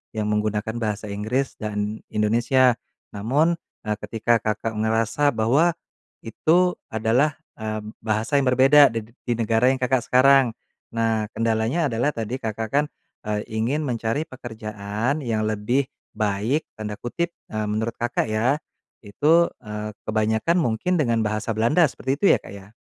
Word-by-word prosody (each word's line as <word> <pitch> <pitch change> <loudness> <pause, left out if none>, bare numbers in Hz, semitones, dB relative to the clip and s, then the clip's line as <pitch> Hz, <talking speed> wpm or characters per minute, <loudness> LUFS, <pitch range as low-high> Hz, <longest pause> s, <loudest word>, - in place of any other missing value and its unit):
yang 110 - -1
menggunakan 105 +2 -1
bahasa 105 -2 -3
Inggris 110 +7 -2
dan 105 0 -3
Indonesia. 120 +4 +3 0.4
Namun, 145 +11 +1 0.2
eee, 105 0 -2
ketika 115 +1 +1
Kakak 110 +1 -2
ngerasa 115 +5 +1
bahwa 140 +10 +3 0.5
itu 175 +10 +2 0.2
adalah, 120 +7 +1 0.2
eee, 110 0 -3 0.2
bahasa 110 +5 0
yang 135 - 0
berbeda 135 +3 +7
d 115 0 -5 0.2
di 120 - +2
negara 115 +1 +2
yang 130 - +4
Kakak 125 -1 +1
sekarang. 130 -2 +5 0.4
Nah 110 -2 +1
kendalanya 115 +7 +1
adalah 120 +6 0
tadi 115 +3 -3
Kakak 110 -1 -4
kan, 145 +3 +3 0.4
eee, 105 0 -1
ingin 120 +8 0
mencari 120 +1 -1
pekerjaan 110 -1 -4
yang 115 -6 -1
lebih 110 +6 0 0.3
baik, 110 +8 0
tanda 105 -1 -4
kutip, 145 +10 -3 0.2
eee, 110 0 -2
menurut 110 +2 -1
Kakak 120 -2 -1
ya, 115 +6 +2 0.5
itu, 155 +11 +3
eee, 105 -1 -6 0.2
kebanyakan 110 +7 +1
mungkin 160 +4 +1
dengan 120 -7 +1
bahasa 110 +1 -1
Belanda 115 +10 +3
seperti 130 -1 -3
itu 175 - 0
ya, - - +4
Kak, - - -11
ya? 95 -1 -12
115 Hz, 145 wpm, -23 LUFS, 110-130 Hz, 0.5 s, berbeda